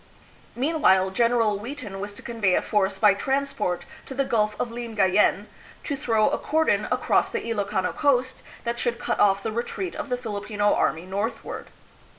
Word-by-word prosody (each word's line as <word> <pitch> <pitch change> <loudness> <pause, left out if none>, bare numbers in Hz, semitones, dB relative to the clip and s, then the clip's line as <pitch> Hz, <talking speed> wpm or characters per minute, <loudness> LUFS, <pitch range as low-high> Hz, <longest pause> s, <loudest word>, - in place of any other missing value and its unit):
Mean 305 +5 -1
while, 190 0 +4
General 230 -1 +2
Wheaton 225 -4 -7
was 205 +1 -6
to - - -11
convey 215 -6 +1
a - - +2
force 195 -2 +1
by 205 0 +5
trans 275 +7 -1
port 180 -4 -2 0.2
to 265 - -7
the 275 +1 +1
Gulf 215 -4 0
of 240 - -2
Lingayen, 210 -4 +2 0.4
to 285 - -2
throw 225 -5 +2
a - - -1
cordon 320 +1 +1
across - - +2
the 465 - -4
Ilokano 200 -4 -1
coast 260 -3 +1 0.2
that 235 0 -2
should 240 -1 -1
cut - - -2
off 195 -1 +4
the 220 - -2
retreat 240 - -3
of 310 -2 -5
the 250 - 0
Filipino 205 -3 -1
army 165 +3 0
northward. 200 +5 -4
220 Hz, 175 wpm, -25 LUFS, 200-250 Hz, 0.4 s, by